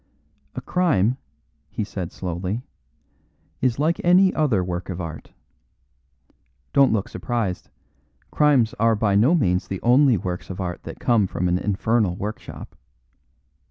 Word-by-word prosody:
"A - - -4
crime," 130 - +1 0.5
he - - -3
said 95 -4 -5
slowly, 95 +6 -4 1.0
"is 125 -2 +1
like 160 +4 0
any 185 +2 +5
other 130 -12 +1
work 90 0 -4
of 90 -1 -4
art. 80 -3 -7 1.4
Don't 140 -1 +5
look 105 -3 0
surprised; 115 -7 -3 0.6
crimes 140 -7 +3
are 115 0 +3
by 105 -1 +1
no 120 - +4
means 90 - +1
the 95 - -4
only 125 0 +5
works 90 -1 -5
of 95 - -6
art 90 -2 -4
that - - -8
come 115 -5 +2
from 90 0 -2
an 90 +1 +1
infernal 105 -1 0
workshop. 105 +4 -7
105 Hz, 135 wpm, -23 LUFS, 90-130 Hz, 1.4 s, any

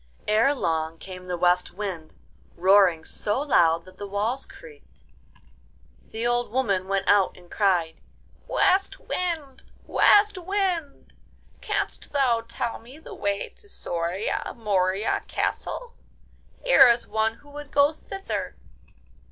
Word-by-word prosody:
Ere 225 +7 +3
long 160 - -1
came 185 +1 -10
the 180 -1 -2
West 180 +1 +2
Wind, 185 -6 -6 0.4
roaring 185 -2 +4
so 210 +5 -2
loud 170 - +3
that 185 - -17
the 205 - -5
walls 215 +7 -1
creaked. 465 -3 -16 1.1
The 225 +1 -4
old 240 0 +1
woman 200 -7 0
went 195 0 -1
out 200 -2 +3
and 175 -1 -18
cried: 180 -6 +1 0.5
'West 385 +1 +2
Wind! 320 -7 -4 0.2
West 415 -1 +4
Wind! 360 -5 -2 0.5
Canst - - -3
thou 255 -5 +2
tell 235 0 -3
me 250 +5 -14
the 320 - -11
way 200 0 -2
to 410 - -19
Soria 175 - -3
Moria 195 -2 0
Castle? 480 -1 -3 0.7
Here - - +7
is 235 0 +3
one 220 +1 0
who 290 +4 -19
would 290 0 -9
go 285 +2 +3
thither. 390 +5 -5
220 Hz, 125 wpm, -25 LUFS, 185-290 Hz, 1.1 s, Here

